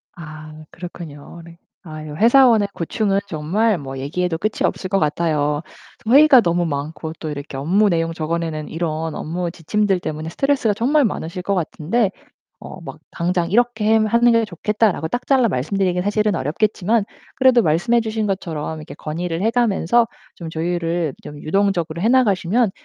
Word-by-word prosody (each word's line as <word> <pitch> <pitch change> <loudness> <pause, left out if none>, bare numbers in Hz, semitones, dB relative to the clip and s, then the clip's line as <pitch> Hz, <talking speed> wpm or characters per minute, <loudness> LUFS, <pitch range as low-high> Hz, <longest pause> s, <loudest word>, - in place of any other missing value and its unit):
아 155 -2 -10 0.2
그렇군요. 170 -2 -9
네. 170 0 -14 0.3
아유 155 -3 -8
회사원의 230 - +5
고충은 195 +4 0
정말 185 +7 0
뭐 135 -3 -7
얘기해도 165 +5 -2
끝이 215 +5 -1
없을 185 - -2
것 195 - +2
같아요. 150 -2 0 0.5
회의가 275 +1 +7
너무 175 -2 +1
많고 155 +2 -4
또 155 - -5
이렇게 145 -1 -7
업무 190 +10 +2
내용 165 -2 0
적어 165 +1 -2
내는 155 -2 -4
이런 160 -1 -3
업무 170 +2 -3
지침들 195 +3 0
때문에 155 -1 -5
스트레스가 270 -1 +1
정말 270 +7 +2
많으실 180 -3 -4
것 200 +1 0
같은데 185 +5 0 0.5
어 - - -10
막 - - -9
"당장 175 0 -1
이렇게 235 -1 +2
햄 220 0 +4
하는 235 +2 +4
게 230 0 +3
좋겠다."라고 210 -1 0
딱 245 +1 -4
잘라 260 -4 +4
말씀드리기는 180 - -1
사실은 210 +1 +1
어렵겠지만 205 - 0 0.3
그래도 260 -2 +5
말씀해 225 +8 +2
주신 220 -1 -2
것처럼 160 -5 -3
이렇게 155 - -10
건의를 165 +2 -4
해 225 - +2
가면서 235 -1 +2 0.3
좀 165 -2 -7
조율을 165 -1 -2
좀 150 - -9
유동적으로 170 -2 0
해 225 - +2
나가시면 220 -3 +2
180 Hz, 375 characters per minute, -20 LUFS, 160-215 Hz, 0.5 s, 회의가